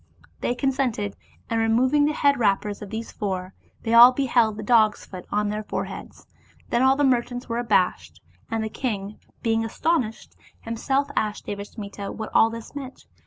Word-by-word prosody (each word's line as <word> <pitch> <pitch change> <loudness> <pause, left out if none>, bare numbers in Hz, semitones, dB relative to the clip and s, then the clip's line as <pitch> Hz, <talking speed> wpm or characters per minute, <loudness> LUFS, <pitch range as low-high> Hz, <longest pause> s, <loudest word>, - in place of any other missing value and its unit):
They 245 - -1
consented, 250 -6 -1 0.3
and 230 - 0
removing 255 +6 +3
the 300 - +1
head 280 -3 +2
wrappers 205 -1 0
of 205 - -7
these 225 +2 -5
four, 190 -2 -4 0.3
they 225 - -1
all 240 +2 +10
beheld 240 -5 +2
the 215 - -5
dog's 215 -2 +3
foot 185 -2 -10
on 210 0 +1
their 210 +1 -2
foreheads. 215 - -6 0.5
Then 240 - +2
all 265 +1 +5
the 290 - +1
merchants 245 -1 0
were 235 -1 -2
abashed, 180 - 0 0.3
and 225 -1 -1
the 220 - -3
king, 210 -4 -4 0.2
being 225 -1 +1
astonished, 225 -1 -1 0.3
himself 265 +5 -1
asked 210 -1 -1
Devasmita 200 0 -6
what 220 -1 -6
all 225 - +5
this 230 0 -9
meant. 270 -2 -8
225 Hz, 165 wpm, -24 LUFS, 210-250 Hz, 0.5 s, all